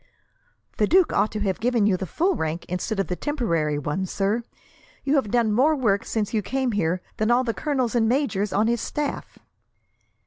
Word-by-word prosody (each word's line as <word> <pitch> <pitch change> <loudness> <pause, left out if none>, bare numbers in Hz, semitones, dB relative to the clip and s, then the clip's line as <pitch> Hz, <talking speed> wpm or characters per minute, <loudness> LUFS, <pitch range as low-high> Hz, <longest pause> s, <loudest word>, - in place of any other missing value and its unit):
"The 210 - +3
duke 365 0 +4
ought 215 - +2
to 215 - -2
have 195 -2 -1
given 235 -2 +2
you 205 -3 +3
the 185 0 -4
full 360 - +1
rank, 160 - -3
instead 190 +4 -3
of 195 - +1
the 180 - -3
temporary 170 - -1
one, 150 +6 -2
sir. 200 +5 0 0.6
You 275 - 0
have 270 -8 +2
done 235 -1 +2
more 285 +8 +4
work, 210 -8 +1
since 215 -1 -2
you 215 - +1
came 260 +4 -1
here, 180 -3 0 0.2
than 215 +1 +1
all 245 +2 +4
the 230 -2 -1
colonels 260 -5 -1
and 225 -2 +2
majors 230 -7 0
on 210 - +2
his 235 0 +1
staff." 295 -1 -4
220 Hz, 200 wpm, -24 LUFS, 195-255 Hz, 0.6 s, duke